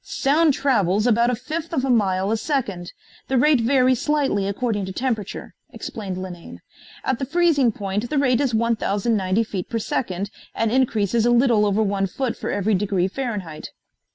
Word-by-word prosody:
"Sound 300 Hz, +1 st, +2 dB
travels 210 Hz, -6 st, +1 dB
about 235 Hz, 0 st, +3 dB
a 250 Hz, -, +1 dB
fifth 310 Hz, +7 st, -5 dB
of 270 Hz, -4 st, 0 dB
a -, -, -2 dB
mile 195 Hz, -3 st, +1 dB
a 225 Hz, -, +1 dB
second. 215 Hz, -, -3 dB, 0.4 s
The 265 Hz, -, +1 dB
rate 285 Hz, 0 st, +4 dB
varies 255 Hz, +1 st, +3 dB
slightly 280 Hz, -11 st, +1 dB
according 205 Hz, 0 st, -1 dB
to -, -, -5 dB
temperature," 220 Hz, -2 st, -3 dB, 0.2 s
explained 195 Hz, -4 st, -6 dB
Linane. 180 Hz, -2 st, -8 dB, 0.4 s
"At 260 Hz, -, -1 dB
the 270 Hz, -, -2 dB
freezing 310 Hz, -6 st, +3 dB
point 205 Hz, +3 st, -3 dB
the 300 Hz, -, -1 dB
rate 255 Hz, -2 st, +3 dB
is 275 Hz, -3 st, +1 dB
1,090 215 Hz, -2 st, +1 dB
feet 195 Hz, -5 st, -5 dB
per 230 Hz, -, -2 dB
second 200 Hz, -3 st, -3 dB, 0.2 s
and 225 Hz, -1 st, 0 dB
increases 235 Hz, -4 st, +1 dB
a -, -, +4 dB
little 240 Hz, -3 st, +4 dB
over 205 Hz, +2 st, +2 dB
one 195 Hz, -1 st, 0 dB
foot 250 Hz, +5 st, -3 dB
for -, -, -5 dB
every 205 Hz, +2 st, 0 dB
degree 190 Hz, -2 st, +1 dB
Fahrenheit." 200 Hz, -, -5 dB
225 Hz, 175 wpm, -22 LUFS, 200-260 Hz, 0.4 s, rate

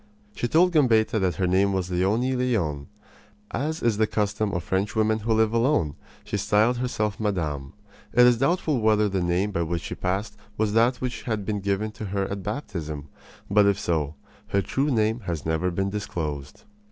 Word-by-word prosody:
She 120 Hz, -, -2 dB
told 175 Hz, +8 st, +4 dB
Gambetta 115 Hz, -8 st, +3 dB
that 95 Hz, -2 st, 0 dB
her 95 Hz, -, 0 dB
name 95 Hz, +2 st, +2 dB
was 90 Hz, -1 st, -2 dB
Leonie 105 Hz, +9 st, +1 dB
Leon. 95 Hz, -, -1 dB, 0.6 s
As 155 Hz, +6 st, -2 dB
is 115 Hz, -3 st, +2 dB
the 110 Hz, 0 st, +3 dB
custom 105 Hz, 0 st, -1 dB
of 90 Hz, -3 st, -2 dB
Frenchwomen 110 Hz, +3 st, +1 dB
who 110 Hz, +2 st, -2 dB
live 110 Hz, 0 st, +2 dB
alone, 115 Hz, -, +2 dB, 0.3 s
she -, -, -3 dB
styled 110 Hz, +4 st, +2 dB
herself 110 Hz, -4 st, -2 dB
madame. 80 Hz, -10 st, -2 dB, 0.4 s
It 125 Hz, +1 st, +6 dB
is 120 Hz, -2 st, +4 dB
doubtful 150 Hz, -2 st, +1 dB
whether 105 Hz, -1 st, +3 dB
the 95 Hz, -2 st, -1 dB
name 90 Hz, +4 st, 0 dB
by 85 Hz, -, -1 dB
which 85 Hz, 0 st, -2 dB
she -, -, -5 dB
passed 100 Hz, +3 st, -2 dB, 0.2 s
was 105 Hz, -1 st, +1 dB
that 120 Hz, +3 st, +3 dB
which 125 Hz, -3 st, -3 dB
had 105 Hz, -3 st, -1 dB
been 105 Hz, 0 st, -1 dB
given 100 Hz, +2 st, -1 dB
to 105 Hz, 0 st, -7 dB
her 100 Hz, 0 st, -1 dB
at 100 Hz, 0 st, -3 dB
baptism; 80 Hz, -, -5 dB, 0.4 s
but, 105 Hz, 0 st, +4 dB
if 100 Hz, 0 st, +2 dB
so, 80 Hz, -6 st, -1 dB, 0.3 s
her 100 Hz, 0 st, +1 dB
true 140 Hz, +8 st, 0 dB
name 110 Hz, -2 st, +1 dB
has 85 Hz, -5 st, -3 dB
never 80 Hz, +3 st, 0 dB
been 95 Hz, +2 st, -1 dB
disclosed. 80 Hz, -9 st, -5 dB
105 Hz, 185 wpm, -25 LUFS, 90-115 Hz, 0.6 s, It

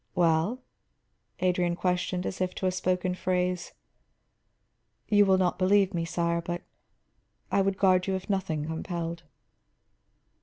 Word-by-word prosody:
"Well?" 175 Hz, +9 st, +2 dB, 0.8 s
Adrian 180 Hz, -1 st, +1 dB
questioned, 180 Hz, 0 st, -1 dB
as 185 Hz, -, -4 dB
if 185 Hz, 0 st, -1 dB
to -, -, -3 dB
a 185 Hz, -, +3 dB
spoken 180 Hz, 0 st, 0 dB
phrase. 180 Hz, -1 st, -1 dB, 1.4 s
"You 205 Hz, -1 st, +5 dB
will 190 Hz, -1 st, +5 dB
not 185 Hz, -1 st, +1 dB
believe 195 Hz, +1 st, +3 dB
me, 170 Hz, -1 st, -1 dB
sire, 170 Hz, 0 st, 0 dB
but 175 Hz, +1 st, -4 dB, 0.9 s
I 200 Hz, -, +3 dB
would 195 Hz, 0 st, 0 dB
guard 185 Hz, -1 st, +3 dB
you 190 Hz, -, +1 dB
if 190 Hz, -, -5 dB
nothing 190 Hz, -7 st, -1 dB
compelled." 170 Hz, +1 st, -4 dB
180 Hz, 130 wpm, -28 LUFS, 175-190 Hz, 1.4 s, You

